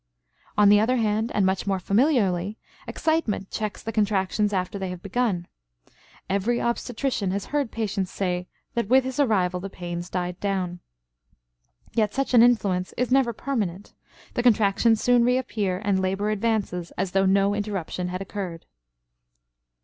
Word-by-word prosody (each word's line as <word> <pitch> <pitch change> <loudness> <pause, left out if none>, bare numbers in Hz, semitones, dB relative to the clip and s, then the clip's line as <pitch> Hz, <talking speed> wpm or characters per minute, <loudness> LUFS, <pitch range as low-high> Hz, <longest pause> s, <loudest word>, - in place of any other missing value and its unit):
On 205 -1 +6
the 205 0 +7
other 235 +4 +2
hand, 220 0 0
and 200 - +3
much 190 +1 0
more 195 -1 +1
familiarly, 205 - +1 0.3
excitement 315 -12 -1
checks 215 -1 -4
the 225 - -3
contractions 205 -1 +1
after 190 0 -2
they 190 -1 -3
have 180 -1 -7
begun. 200 -4 -1 0.8
Every 200 +5 0
obstetrician 235 -3 -1
has 195 +2 -2
heard 285 -5 +1
patients 205 -4 -2
say 180 -2 -2 0.3
that 235 -3 -1
with 260 +3 +5
his 260 +1 -4
arrival 190 -9 +2
the 195 +2 -6
pains 175 -1 -6
died 180 0 -3
down. 185 -3 -2 1.1
Yet 215 -2 +1
such 275 -1 -1
an 240 - +8
influence 200 -7 +2
is 250 +1 0
never 265 -2 +4
permanent; 210 -7 -3 0.4
the - - 0
contractions 225 -1 +3
soon 245 -1 +4
reappear, 225 -7 0
and 195 -2 +2
labor 195 +3 0
advances 205 -5 -1
as 190 0 -1
though 195 0 +3
no 195 +1 +3
interruption 200 -4 -3
had 185 +2 -4
occurred. 185 -4 -6
205 Hz, 150 wpm, -25 LUFS, 185-230 Hz, 1.1 s, an